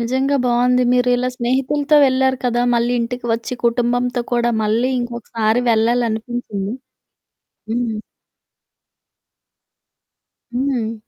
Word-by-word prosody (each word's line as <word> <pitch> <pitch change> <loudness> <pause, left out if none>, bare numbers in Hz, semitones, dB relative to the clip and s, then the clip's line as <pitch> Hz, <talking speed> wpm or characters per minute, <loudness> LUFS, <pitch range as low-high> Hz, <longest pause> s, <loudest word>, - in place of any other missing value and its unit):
నిజంగా 260 +4 0
బావుంది. 250 +1 +3
మీరిలా 250 0 +2
స్నేహితులతో 270 +5 +1
వెళ్లారు 260 0 +1
కదా! 240 -1 +1
మళ్ళీ 235 +1 +1
ఇంటికి 240 +1 -4
వచ్చి 230 +2 -3
కుటుంబంతో 245 +1 +1
కూడా 240 0 +2
మళ్ళీ 225 +4 +1
ఇంకొకసారి 235 -1 -1
వెళ్ళాలనిపించిందా? 225 -2 -1 1.0
హ్మ్. 230 -2 -1 2.6
హ్మ్. 245 -3 -1
245 Hz, 85 wpm, -19 LUFS, 235-250 Hz, 2.6 s, బావుంది